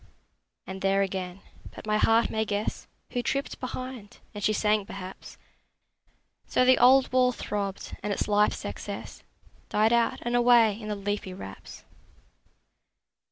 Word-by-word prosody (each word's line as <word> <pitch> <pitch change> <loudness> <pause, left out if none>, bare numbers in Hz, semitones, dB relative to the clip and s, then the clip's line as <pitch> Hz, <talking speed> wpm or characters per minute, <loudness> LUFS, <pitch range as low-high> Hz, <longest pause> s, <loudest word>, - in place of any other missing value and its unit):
And 190 0 -7
there 195 0 +3
again! 185 -1 -4 0.3
But - - -10
my 215 0 +1
heart 225 +1 +3
may 220 0 0
guess 210 0 -3 0.2
Who 245 - -1
tripped 275 +3 -2
behind; 255 -4 -7 0.2
and 205 -1 -7
she 215 - +3
sang, 210 0 +2
perhaps: 190 -1 -9 1.1
So 255 - +3
the 255 0 +5
old 255 +1 +5
wall 255 -1 +4
throbbed, 200 -4 -4
and 210 - -3
its 200 - -1
life's 210 0 +2
excess - - -7 0.5
Died 220 +2 +3
out 235 -1 +2
and 240 0 -1
away 235 -3 +5
in 215 - -7
the 210 - -2
leafy 200 -2 -3
wraps. 95 - -10
215 Hz, 145 wpm, -27 LUFS, 200-240 Hz, 1.1 s, the